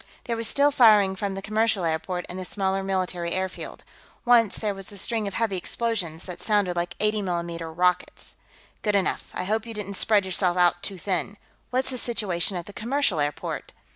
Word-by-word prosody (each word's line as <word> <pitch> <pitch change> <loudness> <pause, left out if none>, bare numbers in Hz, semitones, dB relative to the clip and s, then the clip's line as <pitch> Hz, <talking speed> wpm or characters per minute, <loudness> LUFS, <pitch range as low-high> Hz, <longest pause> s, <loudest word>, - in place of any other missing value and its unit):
There 235 - -2
was 230 -1 -1
still 285 +1 +4
firing 210 -7 +6
from 195 0 -3
the 195 - -6
commercial 215 -3 +1
airport 170 +3 -2
and 180 - -6
the - - -4
smaller 195 0 -1
military 185 -3 -1
airfield. 185 0 -4 0.4
Once 235 -4 +5
there 210 -2 -1
was 195 0 -6
a 200 - -7
string 220 +1 0
of 200 - -5
heavy 220 -4 0
explosions 180 -5 -2
that 180 -2 -8
sounded 205 -5 +1
like 175 0 -2
80 215 0 +2
mm 170 -3 -3
rockets. 180 0 0 0.5
"Good 210 -2 +1
enough. 195 -1 0
I - - -4
hope 220 +4 -1
you 225 - -6
didn't 200 -1 -4
spread 205 0 +3
yourself 185 -1 +1
out 175 0 +3
too 195 - -4
thin. 185 +2 -2 0.3
What's 260 +1 0
the 255 - -2
situation 195 -6 0
at 170 - -5
the 205 - -11
commercial 235 - 0
airport?" 145 0 -3
195 Hz, 195 wpm, -25 LUFS, 180-215 Hz, 0.5 s, firing